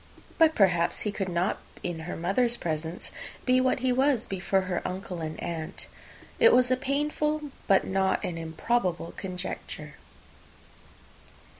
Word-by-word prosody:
But, 320 -1 +6
perhaps, 175 -4 +3
he 210 - 0
could 195 -2 -3
not 175 +3 0 0.2
in 175 -2 -3
her - - -3
mother's 235 +8 +1
presence 160 +1 -3 0.3
be 255 0 +4
what 255 0 +2
he 255 -1 +2
was 260 -2 +2
before 195 0 0
her 185 -1 -2
uncle 180 -2 -4
and 155 0 -4
aunt. 160 -2 -4 0.5
It 465 -1 +7
was 250 0 +5
a - - +5
painful, 295 +2 -1 0.2
but 195 - +5
not 190 0 +1
an 175 - -3
improbable, 165 +2 -1
conjecture. 185 -1 -5
195 Hz, 140 wpm, -28 LUFS, 175-255 Hz, 0.5 s, It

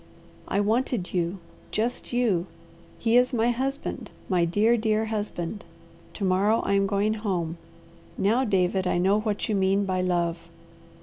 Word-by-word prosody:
"I 200 - 0
wanted 225 -2 0
you! 175 +1 0 0.3
Just 230 +3 -2
you! 220 -8 +1 0.5
He 230 +1 +3
is 250 +1 +3
my 235 +1 +2
husband! 270 +3 -3 0.2
My 180 -3 +3
dear, 210 +7 +3
dear 220 -1 +1
husband! 210 -3 -4 0.5
To 205 - -5
morrow 195 +4 +3
I - - -1
am 195 0 +3
going 205 +2 +1
home! 180 -6 -2 0.6
Now, 225 +7 +2
David, 190 -4 +1
I 180 - +1
know 195 +4 +3
what 215 -1 -2
you 220 - -1
mean 195 0 +2
by 185 -1 0
love!" 175 -2 0
205 Hz, 150 wpm, -26 LUFS, 185-225 Hz, 0.6 s, He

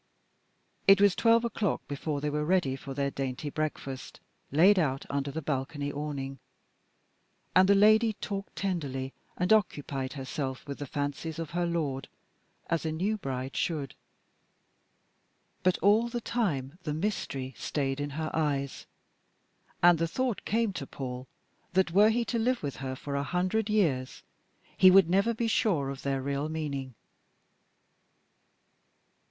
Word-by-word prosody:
It 195 0 +8
was 200 -2 +5
twelve 230 0 +4
o'clock 220 -4 -1
before 145 0 -3
they 150 0 -1
were 150 +1 -1
ready 160 -5 +2
for 135 0 -8
their 140 0 0
dainty 135 +2 -4
breakfast, 140 -4 -4 0.3
laid 185 +7 +6
out 135 -5 0
under 140 0 -1
the 155 +3 -5
balcony 145 +1 -2
awning. 140 -2 -4 1.2
And 185 +1 +6
the 200 - +7
lady 215 +2 +5
talked 200 -1 -5
tenderly 140 -9 -2 0.2
and 180 +4 +3
occupied 145 -10 0
herself 135 0 -4
with 140 - -6
the 145 - -5
fancies 145 +3 -3
of 165 -3 -5
her 175 0 0
lord, 145 -6 -2 0.6
as 165 - 0
a 160 - -1
new 190 +7 0
bride 135 -7 -4
should. 150 -7 -1 1.7
But 185 0 +3
all 215 +4 +5
the 240 0 -3
time 175 - -2
the 150 -4 -3
mystery 160 -8 -3
stayed 135 -2 -2
in 145 0 -2
her 160 -1 -2
eyes. 140 -3 -1 1.0
And 175 -2 +7
the 165 - +1
thought 250 +5 -2
came 225 -2 +1
to 140 -6 -5
Paul 130 -1 -6 0.5
that 185 -2 +3
were 205 +4 +6
he 235 +1 +1
to 235 - -1
live 250 -1 +1
with 140 -2 -3
her 130 -1 -4
for 140 +2 -5
a 140 - +1
hundred 185 +9 0
years, 155 -12 0 0.5
he 185 - +8
would 185 -2 +6
never 200 +5 +3
be 230 +1 0
sure 165 -11 +1
of 140 - -7
their 135 -1 -1
real 140 +2 -2
meaning. 140 -5 -4
155 Hz, 150 wpm, -29 LUFS, 140-195 Hz, 1.7 s, It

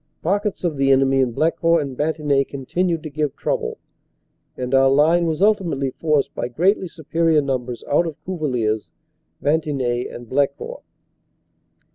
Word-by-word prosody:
Pockets 200 +4 -1
of 165 -5 -1
the 135 0 +2
enemy 135 0 +4
in 130 -2 +2
Ble 155 +8 +2
court 165 -2 +2
and 135 -2 -6
Bantigny 150 -1 +1
continued 165 +5 -2
to 155 - -5
give 150 -1 -2
trouble, - - -2 0.8
and 125 +1 -4
our 135 0 +5
line 160 +5 +4
was 160 +3 0
ultimately 170 -11 +1
forced 150 0 0
by - - -3
greatly 180 - +1
superior 165 0 +1
numbers 130 -4 -3
out 170 +4 +2
of 160 - -6
Cuvillers, 125 - -1 0.5
Bantigny 140 -5 0
and 120 0 -9
Blecourt. 140 - -1
150 Hz, 145 wpm, -21 LUFS, 135-165 Hz, 0.8 s, our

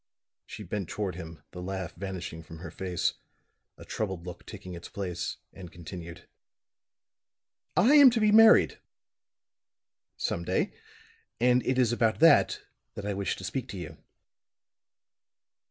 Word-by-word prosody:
She 105 - -8
bent 95 -1 -4
toward 100 -3 -3
him, 80 -3 -9
the 90 - -8
laugh 95 -1 -4
vanishing 90 -3 -6
from 80 0 -11
her 85 -1 -8
face, 90 -1 -1 0.6
a - - -12
troubled 95 -5 -4
look 90 -1 -9
taking 90 - -9
its 85 - -9
place, 90 -3 -4 0.2
and 90 -3 -10
continued. 85 0 -9 1.5
"I 220 +11 +5
am 285 -3 +9
to 235 -1 0
be 215 -1 +4
married 220 +1 +6 1.4
some 85 - -2
day - - 0 0.7
and 125 +1 +3
it 130 - +1
is 125 -3 +3
about 115 -2 +1
that 160 -2 +5 0.3
that 100 - -6
I 105 - -1
wish 100 -2 -2
to - - -10
speak 125 +7 -3
to 100 - -7
you." 90 - -8
95 Hz, 140 wpm, -28 LUFS, 85-120 Hz, 1.5 s, am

